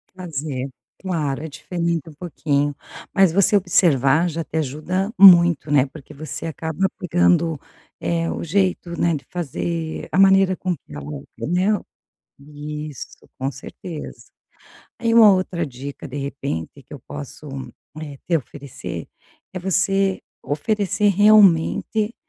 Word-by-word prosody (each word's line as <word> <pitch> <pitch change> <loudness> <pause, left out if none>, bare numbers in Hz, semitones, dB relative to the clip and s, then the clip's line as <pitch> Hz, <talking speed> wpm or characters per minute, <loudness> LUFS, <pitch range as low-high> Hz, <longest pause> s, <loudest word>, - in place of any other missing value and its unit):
Fazer, 145 -7 -4 0.3
claro, 155 -7 -2
é - - -4
diferente 170 +1 -3
um 160 - -10
pouquinho. 145 -3 -1 0.4
Mas 190 -4 +4
você 200 +2 +4
observar 170 -4 +3
já 165 0 -3
te 160 - -5
ajuda 160 - -2
muito, 175 -5 +7
né, 140 -2 +4
porque 150 +1 -13
você 150 +1 -6
acaba 160 +3 -1
pegando, 170 -2 +2 0.4
eh, 165 0 -1
o - - -4
jeito, 175 -1 -1
né, 170 -1 +2
de 140 - -7
fazer 165 0 -4
a 185 - +1
maneira 195 -1 +5
com 180 -1 -2
que 100 - -17
ela, 75 -1 -7
né. 185 +5 +1 0.6
Isso, 150 -1 -8
com 135 +1 -2
certeza. 150 +4 -9 0.7
Aí 230 -1 0
uma 220 -3 +8
outra 185 -2 -1
dica 140 +1 -8
de 135 - -7
repente 140 - -5
que - - -17
eu - - -7
posso, 70 - -8 0.6
eh, 145 -2 -7
te 170 - +2
oferecer, 140 -1 -7 0.5
é 185 - -4
você 195 +1 +1 0.2
oferecer 200 +6 0
realmente, 210 +2 +4
165 Hz, 130 wpm, -21 LUFS, 145-185 Hz, 0.7 s, uma